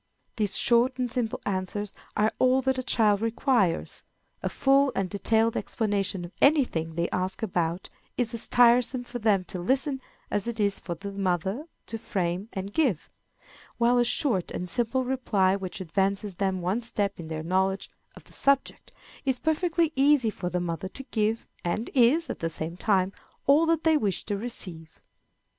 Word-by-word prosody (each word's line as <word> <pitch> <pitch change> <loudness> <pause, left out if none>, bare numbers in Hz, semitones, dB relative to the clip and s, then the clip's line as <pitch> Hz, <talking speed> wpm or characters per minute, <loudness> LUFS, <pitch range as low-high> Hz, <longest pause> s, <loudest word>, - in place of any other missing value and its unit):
These 210 -3 +1
short 240 +2 +3
and 250 -2 -2
simple 230 -2 -1
answers 200 +1 -2 0.2
are 215 +1 +2
all 255 +1 +4
that 265 0 +1
a - - 0
child 215 -5 +2
requires. 225 - 0 0.4
A - - -1
full 275 0 +3
and 195 - 0
detailed 220 +4 +1
explanation 200 -4 -1
of 175 - -11
any 285 0 +6
thing 165 -8 -4
they 170 0 0
ask 185 +4 -2
about 175 -3 -1 0.3
is 240 -2 0
as 230 - 0
tiresome 245 +1 +4
for 245 0 -7
them 210 -4 +2
to 180 - -6
listen 265 - +1
to - - -32 0.3
as 205 +2 0
it 235 -1 -4
is 200 -1 +2
for 170 - -5
the 200 +4 -7
mother 195 - -1 0.2
to 225 - -6
frame 185 -1 -2
and 195 +1 -5
give; 250 - +1 0.7
while 240 +1 +3
a - - +5
short 240 - +1
and 180 - -4
simple 240 +7 0
reply 210 -7 +1
which 190 -2 -6
advances 195 +3 -1
them 190 -2 0
one 190 +7 0
step 205 -4 -1
in 165 - -7
their 155 -1 -4
knowledge 190 +3 0 0.3
of - - -13
the - - -17
subject 275 -1 0 0.3
is 265 -2 +1
perfectly 325 +2 +1
easy 270 -4 +4
for 180 -3 -4
the 180 - -1
mother 175 +1 -3
to 270 +8 -6
give, 220 0 0 0.2
and 175 +6 -2
is, 265 +6 +4
at - - -5
the 165 - -1
same 160 +1 -5
time, 190 0 +1 0.3
all 300 +4 +5
that 330 -1 +2
they 320 -1 +4
wish 205 -9 -1
to 205 - -2
receive. 180 -7 -6
210 Hz, 180 wpm, -27 LUFS, 185-250 Hz, 0.7 s, any